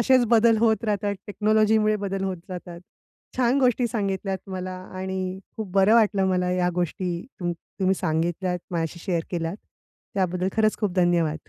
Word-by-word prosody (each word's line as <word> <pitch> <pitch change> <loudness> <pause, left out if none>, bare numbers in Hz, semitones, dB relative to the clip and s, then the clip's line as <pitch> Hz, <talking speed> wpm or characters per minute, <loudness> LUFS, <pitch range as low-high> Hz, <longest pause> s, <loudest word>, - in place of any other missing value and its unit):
असेच 255 +1 +5
बदल 230 0 +5
होत 225 0 +2
राहतात, 205 -1 0
टेक्नॉलॉजीमुळे 215 +1 +3
बदल 195 -1 -3
होत 190 -1 -2
जातात. 175 -1 -7 0.6
छान 255 +1 +3
गोष्टी 250 -1 +3
सांगितल्यात 195 -3 -2
मला 185 0 -4 0.3
आणि 190 0 -3 0.2
खूप 215 -4 -5
बरं 195 +3 +5
वाटलं 205 -4 +4
मला 180 -1 +1
या 180 0 +1
गोष्टी 180 +1 -1 0.3
तुम 175 -1 -1
तुम्ही 190 +3 -2
सांगितल्यात. 175 +1 -1
माझ्याशी 170 0 -2
शेअर 175 -4 0
केल्या, 170 -1 -2 0.6
त्याबद्दल 185 -1 0
खरंच 215 -1 +3
खूप 205 -5 0
धन्यवाद. 170 -3 +1
190 Hz, 150 wpm, -25 LUFS, 180-215 Hz, 0.6 s, असेच